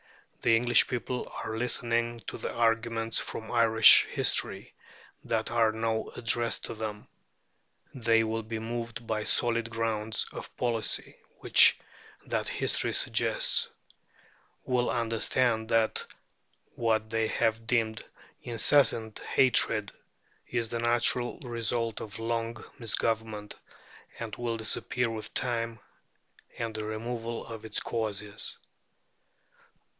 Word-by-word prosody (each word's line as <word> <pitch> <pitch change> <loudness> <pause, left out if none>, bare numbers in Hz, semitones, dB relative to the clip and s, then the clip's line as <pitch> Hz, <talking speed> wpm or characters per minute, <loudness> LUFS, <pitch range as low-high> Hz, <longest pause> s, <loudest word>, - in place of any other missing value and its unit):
The 115 - +4
English 120 0 +4
people 125 0 -4
are 110 - -4
listening 115 0 -1
to - - -7
the - - -4
arguments 115 -1 +1
from 110 - -6
Irish 115 -2 +8
history - - 0 0.5
that 110 0 -2
are 115 -2 +3
now 110 0 -2
addressed 115 0 0
to - - -5
them. 110 -2 -6 0.9
They 115 -3 +2
will 115 0 -2
be 110 +1 -5
moved 115 0 -5
by 110 -1 -1
the 105 - -5
solid 115 -1 +2
grounds 110 -1 -2
of - - -10
policy 115 -3 -1 0.2
which - - +7 0.5
that - - -2
history - - 0
suggests; - - +1 1.0
will 125 -1 +1
understand 115 0 0
that 115 -1 +1 0.7
what 110 -1 0
they 115 -1 +1
have 115 0 -1
deemed 115 -3 0 0.4
insensate 115 -2 +3
hatred 130 -2 +2 0.6
is 115 -2 -2
the 115 - -3
natural 120 +1 +2
result 115 -2 -2
of 105 -2 -7
long 115 0 -2 0.2
misgovernment, 110 -2 -2 0.6
and 115 -2 -6
will 120 -1 -3
disappear 115 +2 -1
with 110 -1 -6
time 115 -3 -2 0.8
and 115 -1 -3
the 110 0 -4
removal 115 +2 -4
of 115 -1 -8
its 110 - -3
causes. 105 -2 -4
115 Hz, 115 wpm, -29 LUFS, 110-120 Hz, 1.0 s, Irish